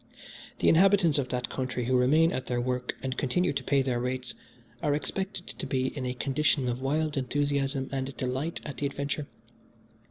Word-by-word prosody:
The - - +1
inhabitants 180 -3 +5
of 130 - -2
that 125 -1 -2
country 130 -2 -2
who 130 +2 +2
remain 150 +7 +4
at 130 - -3
their 120 -1 0
work 125 0 -1
and 130 -1 -2
continue 170 +6 +1
to - - -2
pay 140 -2 +2
their 125 -2 0
rates 125 +1 -3 0.5
are 145 -1 +2
expected 190 +8 -3
to - - -5
be 130 -1 -1
in 130 -3 -3
a 125 - -2
condition 135 0 +1
of 125 +1 -2
wild 150 +2 0
enthusiasm 135 0 0
and 135 0 -3
delight 130 +6 -2
at 145 - -6
the 145 - 0
adventure. 140 +1 -3
135 Hz, 185 wpm, -29 LUFS, 130-150 Hz, 0.5 s, inhabitants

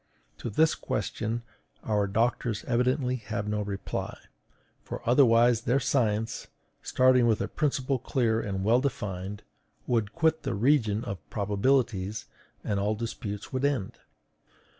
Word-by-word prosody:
To - - -4
this 155 +9 +3
question 115 +2 -3 0.4
our 105 -2 +1
doctors 115 +1 0
evidently 125 +1 +1
have 105 -2 -4
no 105 0 -1
reply; 100 -1 -4 0.6
for 120 - -8
otherwise 120 -2 +5
their 125 +3 +2
science, 115 -5 0 0.3
starting 130 -1 +4
with 110 -2 +2
a - - -1
principle 135 -3 0
clear 115 -3 +1
and 95 -3 -3
well 115 +5 +4
defined, 100 -7 -4 0.4
would 110 -4 0
quit 160 +4 +2
the - - -2
region 110 -2 +2
of 100 -7 -5
probabilities, 105 -1 0 0.4
and 100 -1 -1
all 105 +2 0
disputes 105 -1 -5
would 130 +1 -1
end. 135 -9 -1
115 Hz, 130 wpm, -28 LUFS, 105-130 Hz, 0.6 s, otherwise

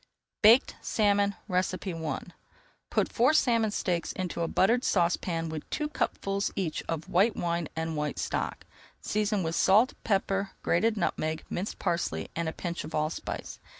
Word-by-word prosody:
BAKED 230 +6 +6
SALMON 205 -2 +2
I 180 -5 -1 0.7
Put - - 0
four 250 +5 +4
salmon 230 -7 +3
steaks 180 -4 -1
into 180 -2 -3
a 165 - +1
buttered 235 +9 +3
saucepan 170 -2 +1
with 155 -1 -6
two 300 -1 -2
cupfuls 200 -8 -1
each 175 -6 -2
of 165 -1 -3
white 200 +6 +3
wine 170 -2 -1
and 160 0 -2
white 150 -1 -2
stock. - - -3 0.3
Season 210 -2 0
with 165 0 -2
salt, 210 +8 +4
pepper, 195 -1 0
grated 220 +5 +2
nutmeg, 160 -3 -1
minced 190 +4 -3
parsley, 80 - -2
and 170 -1 -1
a - - -3
pinch 170 +1 -4
of 155 +2 -6
allspice. 155 +1 -3
185 Hz, 150 wpm, -29 LUFS, 165-205 Hz, 0.7 s, BAKED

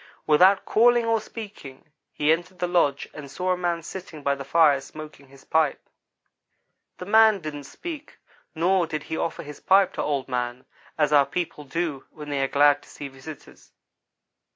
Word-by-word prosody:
Without 185 +6 +5
calling 240 +1 +4
or 225 -1 +1
speaking, 200 - -10 0.3
he 150 +1 +1
entered 175 +3 -1
the 180 - -1
lodge 150 -6 +1
and 145 -2 -9
saw 185 +5 -2
a - - +2
man 175 -2 -2
sitting 170 -4 -9
by 140 - +2
the 140 0 -6
fire 145 -1 +4
smoking 150 -1 -11
his 135 0 -18
pipe. 160 -3 +1 1.2
The 180 - -7
man 220 0 +5
didn't 150 -4 -7
speak, 310 - -9 0.4
nor 175 +1 +2
did 155 -2 -4
he 160 - -5
offer 165 - -3
his 150 -1 -10
pipe 195 0 +3
to - - -3
Old 140 -3 -2
man, 125 -1 -3 0.3
as 150 -1 +2
our 140 -2 +5
people 170 -4 -4
do 155 -2 -3
when 150 -2 -10
they 140 -1 -1
are - - +1
glad 145 +1 +4
to - - -19
see 145 - -8
visitors. 135 +3 -13
155 Hz, 175 wpm, -24 LUFS, 140-185 Hz, 1.2 s, Without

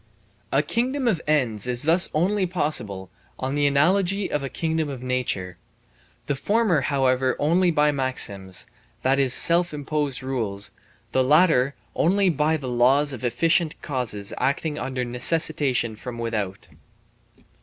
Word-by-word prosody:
A - - +2
kingdom 255 +3 -1
of 180 -8 +1
ends 125 -8 +1
is 125 -1 0
thus 165 +4 +3
only 185 +4 0
possible 105 - -3 0.3
on 130 +1 -3
the 145 0 +2
analogy 185 +7 +1
of 150 - -1
a 135 - -4
kingdom 160 0 -2
of 130 -3 -7
nature, 100 -9 -3 0.7
the 145 - -1
former 205 +1 +1
however 130 -1 +1
only 175 +5 +2
by 150 -2 +2
maxims, 105 -9 -1 0.4
that 135 +2 +2
is 135 -2 +2
self 170 +4 +4
imposed 145 -2 -3
rules, 105 -7 -3 0.4
the 130 - +2
latter 140 -2 +3 0.2
only 195 +3 +2
by 155 0 +1
the 135 -4 -7
laws 130 +4 +2
of 130 - -8
efficient 160 +6 +1
causes 115 -8 -3
acting 150 +3 -1
under 130 -1 -3
necessitation 125 -2 +2
from 120 +2 -8
without. 110 -5 -4
140 Hz, 140 wpm, -23 LUFS, 125-160 Hz, 0.7 s, self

